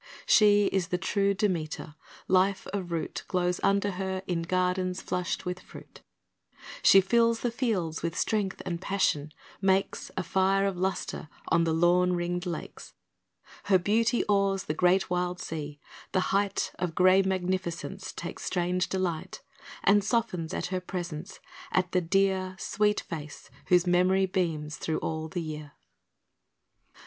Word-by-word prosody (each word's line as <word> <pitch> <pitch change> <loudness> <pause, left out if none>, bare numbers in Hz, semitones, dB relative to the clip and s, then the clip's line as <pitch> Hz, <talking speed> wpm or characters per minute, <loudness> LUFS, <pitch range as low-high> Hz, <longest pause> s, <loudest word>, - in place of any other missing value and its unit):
She 205 -1 +5
is 190 -3 0
the 180 - -1
true 200 +1 +1
Demeter. 170 -8 -2 0.3
Life 190 +1 +2
of 185 -4 -3
root 165 -1 -3
Glows 180 -1 0
under 200 +1 +2
her 190 0 -3
in 175 -2 -1
gardens 185 +1 0
flushed 180 0 -3
with 180 0 -3
fruit; - - -14 0.8
She 195 - +7
fills 230 +3 +2
the 240 - 0
fields 200 -10 -1
with 170 +1 -3
strength 205 -3 -1
and 175 -2 -3
passion 155 -7 0 0.3
makes 195 0 +1
A 185 - 0
fire 195 +2 +2
of 195 -1 0
lustre 180 -4 -3 0.2
on 165 0 +3
the 165 - +1
lawn 175 +2 +3
ringed 175 +1 -2
lakes; 170 - -7 0.7
Her 195 -2 +5
beauty 225 +6 +2
awes 195 -1 +2
the 150 - -2
great 180 +3 +2
wild 180 0 -1
sea; 150 -2 -6 0.3
the 185 0 0
height 200 0 +1
Of 175 -3 -2
grey 185 +1 +6
magnificence 190 0 -2
takes 170 - -7
strange 180 0 0
delight 185 +1 -3 0.4
And 205 0 +5
softens 200 -7 -1
at - - -2
her 185 - -1
presence, 180 0 -6 0.3
at 185 -1 +1
the 180 - +2
dear 190 +1 +1
Sweet 210 +1 +1
face 150 -3 -8 0.2
whose 180 0 +4
memory 180 +2 +3
beams 165 -5 -2
through 160 - -2
all 160 0 -3
the 170 +1 -4
year. 150 -2 -7
185 Hz, 145 wpm, -28 LUFS, 175-195 Hz, 0.8 s, She